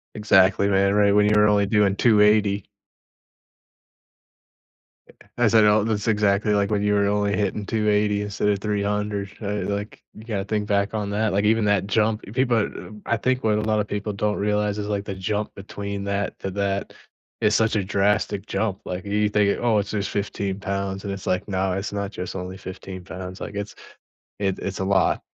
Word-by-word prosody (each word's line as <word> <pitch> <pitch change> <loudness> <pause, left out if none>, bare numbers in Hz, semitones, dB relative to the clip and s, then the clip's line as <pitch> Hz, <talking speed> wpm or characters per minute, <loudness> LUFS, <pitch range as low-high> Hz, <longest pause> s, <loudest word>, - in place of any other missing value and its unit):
Exactly, 100 -1 +4
man, 100 0 +3
right, 100 -1 +4
when 105 0 +4
you 105 - +3
were 105 0 +5
only 100 -1 +3
doing 100 -1 +3
280. 105 -2 +3 2.8
I 120 - +5
said, 110 0 +5
oh, 105 0 +4
that's 110 -1 -1
exactly 105 -1 +2
like 100 +1 +1
when 105 -1 +1
you 105 0 +2
were 100 0 +2
only 100 -1 +1
hitting 105 +1 -1
280 105 -1 +1
instead 105 0 -2
of 100 - +2
300, 105 0 -2
uh, 105 0 -2
like, 100 +1 -5
you 110 - -13
gotta 105 -4 -3
think 105 0 -2
back 100 +1 0
on 105 -2 -2
that, 105 0 0
like, 100 +1 +1
even 110 +1 +3
that 100 -2 +2
jump, 105 +1 +1
people, 125 -2 +2
uh, 110 0 -3
b 105 - -12
I 120 - +1
think 130 +2 -1
what 105 -1 +3
a - - +1
lot 110 0 +1
of 105 - 0
people 105 0 -3
don't 105 +1 -1
realize 105 0 0
is, 105 0 -3
like, 100 -1 -2
the 100 - -5
jump 105 +3 -3
between 100 0 -6
that 100 0 -2
to 95 - -3
that 100 0 -2 0.5
is 105 0 +3
such 110 0 +2
a 100 - 0
drastic 100 0 0
jump, 105 -4 -2
like, 90 +1 -5
y 100 - -7
you 105 0 +2
think, 105 -1 +2
"Oh, 115 -3 +3
it's 100 0 -2
just 100 -2 -2
15 100 -1 -3
pounds," 100 0 -3
and 100 - -3
it's 95 - -7
like, 90 - 0
"No, 95 -1 -1
it's 95 +2 -4
not 100 -1 -3
just 90 -3 -6
only 95 0 -5
15 95 -1 -8
pounds," 95 0 -8
like, - - -6
it's 100 0 -5 0.6
it 95 -2 0
it's 95 0 -4
a - - -1
lot, 95 -1 +2
105 Hz, 205 wpm, -23 LUFS, 100-105 Hz, 2.8 s, were